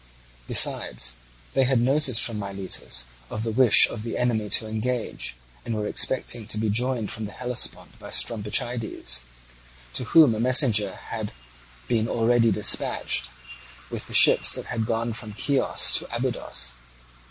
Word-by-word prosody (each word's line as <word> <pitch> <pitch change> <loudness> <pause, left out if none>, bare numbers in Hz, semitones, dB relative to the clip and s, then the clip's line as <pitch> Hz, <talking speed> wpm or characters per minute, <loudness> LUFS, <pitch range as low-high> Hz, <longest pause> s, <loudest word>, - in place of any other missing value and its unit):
Besides, - - +2 0.4
they 135 - +3
had 130 -1 +2
notice 130 0 +2
from 115 -2 0
Miletus 95 -11 -3 0.2
of 110 - -4
the 115 - -2
wish 120 -1 +6
of 115 - -7
the 115 +1 -4
enemy 110 -4 0
to 110 +3 +2
engage, 110 - -3 0.3
and 115 - -3
were 105 -1 -2
expecting 120 -1 0
to 110 - -3
be 110 -1 0
joined 120 0 -1
from 110 - -5
the 105 - -7
Hellespont 125 +2 -2
by - - -10
Strombichides, 110 - -1 0.7
to 125 - -3
whom 155 -2 +6
a 110 - -4
messenger 115 -6 +2
had 110 -2 -6 0.5
been 115 -1 +1
already 115 0 +3
dispatched, 100 - +1 0.6
with - - -5
the - - -6
ships - - +6
that - - -5
had 115 -2 -3
gone 115 0 -1
from 110 -1 -8
Chios 140 +3 0
to - - -11
Abydos. - - -4
115 Hz, 150 wpm, -25 LUFS, 105-125 Hz, 0.7 s, wish